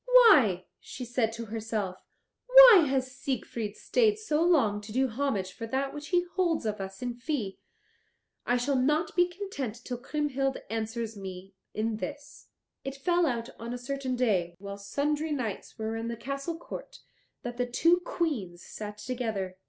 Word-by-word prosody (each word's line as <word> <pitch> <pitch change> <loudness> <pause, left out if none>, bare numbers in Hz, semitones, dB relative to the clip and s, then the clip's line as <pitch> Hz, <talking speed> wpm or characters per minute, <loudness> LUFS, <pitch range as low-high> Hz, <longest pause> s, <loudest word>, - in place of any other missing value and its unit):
"Why," 305 - +7
she 250 - -7
said 235 -2 0
to 230 0 -5
herself, 215 -4 -3 0.4
"why - - +10
has 260 -1 0
Siegfried 235 -5 -3
stayed 435 -4 +2
so 320 -8 0
long 275 -13 +3
to 210 +1 -10
do 260 +3 +2
homage 220 -6 -1
for 230 - -6
that 270 +3 -1
which 295 0 -7
he 355 +1 +2
holds 345 - +1
of 210 -2 -2
us 195 +3 -7
in 245 -1 -2
fee? 240 -5 -3 0.8
I 245 - +2
shall 265 +3 +1
not 300 +6 +1
be 355 -1 +5
content 345 - -5
till 245 -2 -4
Kriemhild 270 -1 -1
answer 225 +1 -2
me 190 -1 -8 0.2
in 220 0 -1
this." 290 +5 -7 0.4
It 270 0 -4
fell 345 +4 +2
out 235 -3 -2
on 235 +2 -4
a - - -4
certain 260 +1 -3
day, 190 -9 +1
while 200 +1 -7
sundry 295 +9 -1
knights 240 -9 -4
were 220 0 -3
in 225 +1 -3
the 235 0 -4
castle 275 +7 -4
court, - - -9 0.4
that 240 0 -5
the 245 0 0
two 335 +8 +4
Queens 240 - -3
sat 210 -1 -7
together. 215 -5 -3
250 Hz, 170 wpm, -29 LUFS, 220-300 Hz, 0.8 s, why